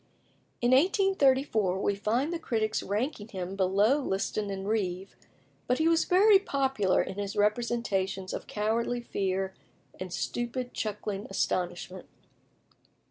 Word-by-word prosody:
In 240 +1 +2
1834 270 - +3
we 200 - +1
find 235 +10 0
the 340 - -3
critics 220 -7 -1
ranking 210 +2 -2
him 190 -3 -5
below 200 +8 +3
Liston 200 -3 -2
and 195 0 -4
Reeve, 195 -3 -2 0.5
but 250 - +2
he 315 - +2
was 330 0 +3
very 390 +2 +6
popular 265 - +1
in 195 +1 -6
his 200 -1 -4
representations 210 -3 0
of - - -5
cowardly 230 +3 -1
fear 190 -4 -2 0.5
and 185 -1 -6
stupid 240 +5 -3
chuckling 210 -1 -4
astonishment. 180 -1 -2
215 Hz, 125 wpm, -29 LUFS, 195-255 Hz, 0.5 s, very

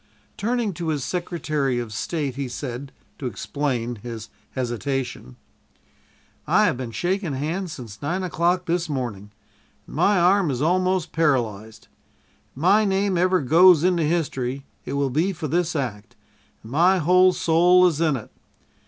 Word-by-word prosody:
Turning 230 -1 -1
to 170 0 -5
his 150 -4 -1
Secretary 155 -7 -2
of 120 -3 -4
State, 145 +4 -3
he 135 +1 -4
said, 130 +1 -6 0.3
to 130 - -3
explain 125 -3 -3
his 115 0 -8 0.3
hesitation: 125 - -3 1.1
"I - - +4
have - - +1
been 125 -1 -5
shaking 175 - -2
hands 165 +5 -3
since 115 -5 -10
nine 175 +6 -2
o'clock 180 +1 0
this 170 -1 -1
morning, 120 -8 -4 0.6
and - - -11
my 200 -2 +3
arm 180 0 +3
is 130 -3 -2
almost 185 +3 +1
paralyzed. 115 -9 -1 0.7
If - - -21
my 190 +8 +4
name 195 -1 +1
ever 185 +1 +2
goes 165 +4 +6
into 180 -2 +2
history, 140 -5 -2 0.2
it - - -5
will 140 -1 0
be 165 +9 +1
for 165 -3 -5
this 170 +3 0
act, 115 -7 -4 0.5
and 110 - -11
my 175 +7 +4
whole 180 +2 +5
soul 180 +1 +4
is 165 -3 +1
in 155 -4 +2
it. 115 - -8
155 Hz, 155 wpm, -23 LUFS, 125-180 Hz, 1.1 s, goes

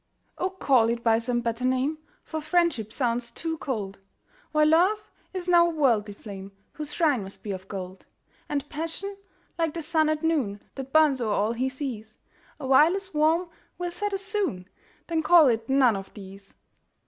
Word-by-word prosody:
Oh, 370 - 0
call 265 -11 +3
it 235 0 -2
by 225 -1 +4
some 240 +1 -1
better 230 +1 -3
name, 260 +4 +1 0.2
For 315 -1 -5
Friendship 310 - +1
sounds 240 -2 -1
too 320 +6 -4
cold, 205 -8 -4 0.5
While 305 0 +4
Love 370 +7 +3 0.2
is 370 -2 -4
now 345 -1 +6
a 335 - -3
worldly 225 -9 +2
flame, 195 -2 -9 0.2
Whose 300 -1 -5
shrine 295 -7 +2
must 195 0 -10
be 210 - -4
of 190 0 -6
gold: 190 -1 -7 0.4
And 290 -1 -2
Passion, 330 +7 -4 0.4
like 330 -2 0
the 335 - -3
sun 315 0 +2
at 310 +1 -1
noon, 275 -12 0
That 270 -1 -7
burns 300 -4 +4
o'er 215 -3 0
all 210 +2 +1
he 255 +3 -1
sees, 245 -6 -6 0.4
Awhile 295 +5 +5
as 390 -2 -6
warm 320 +4 +2 0.3
will 355 -1 -3
set 410 +4 -3
as 390 0 -2
soon 390 - -2 0.4
Then 330 -1 0
call 320 -1 +7
it 225 0 -1
none 265 -4 +4
of 195 0 -7
these. 195 -1 -12
275 Hz, 180 wpm, -26 LUFS, 225-330 Hz, 0.5 s, call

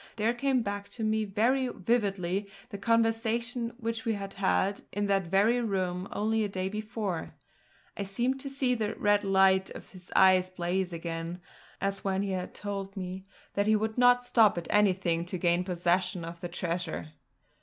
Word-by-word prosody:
There 225 +2 +1
came 255 0 +1
back 200 -1 -4
to 225 - -3
me 215 0 +1
very 235 +6 +1
vividly 200 -3 -1 0.2
the 200 -4 -7
conversation 230 +2 0
which 230 -1 -3
we 225 -2 0
had 195 -1 -5
had 195 0 +1
in 205 0 -1
that 195 -3 +1
very 210 +7 +3
room 185 -4 -1
only 220 +1 0
a 205 - -1
day 190 -1 -2
before; 210 -4 -4 0.6
I - - -4
seemed 240 +7 -1
to 275 +1 -5
see 270 -2 +1
the 215 -3 -2
red 205 0 +2
light 190 -1 +4
of - - -11
his 185 -1 -14
eyes 185 -1 +6
blaze 185 +1 -1
again, 165 +1 -4 0.4
as 195 0 -2
when 195 0 0
he 200 - -2
had 185 -1 -4
told 200 -1 -5
me 185 +1 -6 0.3
that 200 +1 +1
he 215 - +5
would 220 +1 -1
not 245 0 +5
stop 230 -6 +4
at 170 - -3
anything 185 -5 +2
to 185 +1 -4
gain 175 +1 +2
possession 180 0 0
of 170 0 -8
the 175 - -4
treasure. 170 -2 -3
200 Hz, 175 wpm, -29 LUFS, 185-225 Hz, 0.6 s, eyes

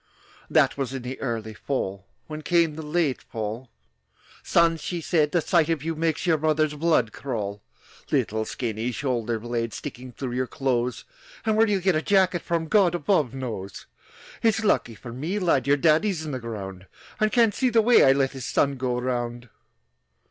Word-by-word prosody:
That - - +3
was 135 -1 -2
in 130 - -5
the 130 +2 -6
early 115 -4 -3
fall. 100 -6 -4 0.2
When 155 0 -7
came 170 -1 +2
the 160 - -6
late 150 -3 0
fall, 110 +2 -5 0.7
"Son," 170 -1 +3
she 175 +2 -4
said, 155 -2 +1
"the 170 - +2
sight 170 -2 +2
of 160 -4 0
you 165 +1 -1
Makes 160 +1 -1
your 165 -3 +3
mother's 155 0 +1
blood 150 -7 +1
crawl,– 105 -7 -4 0.5
"Little 110 +1 +1
skinny 115 0 -3
shoulder 120 -2 -1
blades 115 0 -3
Sticking 125 +1 -7
through 130 0 -5
your 125 +1 -1
clothes! 125 -1 -1 0.4
And 220 - +2
where 225 +1 +4
you'll 200 -2 +1
get 190 0 +3
a 155 - +1
jacket 185 -2 +2
from 165 -1 -2
God 185 -2 +4
above 150 - +1
knows. 110 -7 -6 0.6
"It's 225 0 +2
lucky 155 - +1
for 120 +2 -9
me, 155 +11 -3
lad, 165 -9 +1
Your 145 +1 +4
daddy's 160 +3 +2
in 150 - -4
the 130 - -3
ground, 100 -5 -7 0.3
And 215 0 +2
can't 230 -3 +4
see 255 - +1
the 225 -2 +4
way 240 +2 +6
I 135 - +7
let 135 -1 +2
His 130 -3 -6
son 140 -1 +1
go 125 -1 -1
around!" 120 -1 -3
140 Hz, 185 wpm, -25 LUFS, 120-170 Hz, 0.7 s, I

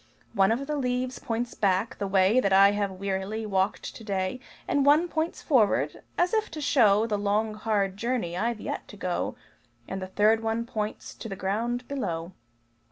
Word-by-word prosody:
One 195 -2 +4
of 250 +5 -1
the 300 +1 -2
leaves 250 -1 -1
points 240 -1 -3
back, 200 +4 0
the 200 - -1
way 195 +4 +4
That 200 -6 +1
I 195 +1 +7
have 205 -1 0
wearily 195 +3 -3
walked 195 0 -1
to - - -10
day; 195 +2 -2 0.3
One 290 +4 +4
points 320 0 -2
forward 240 -9 +2 0.2
as 355 +3 +2
if 435 -1 +1
to 310 - -7
show 225 -7 +4
The 210 -3 -1
long, 210 +2 0
hard 205 -3 -1
journey 230 -7 -2
I've 230 +4 -1
yet - - -5
to 205 - -12
go; 180 -2 -2 0.5
And 190 0 -4
the 185 - -4
third 210 +4 +3
one 225 +1 -1
points 215 -3 -4
to 225 - -8
the 195 - -4
ground 230 +6 -2
below. 175 -11 -3
215 Hz, 180 wpm, -27 LUFS, 195-245 Hz, 0.5 s, I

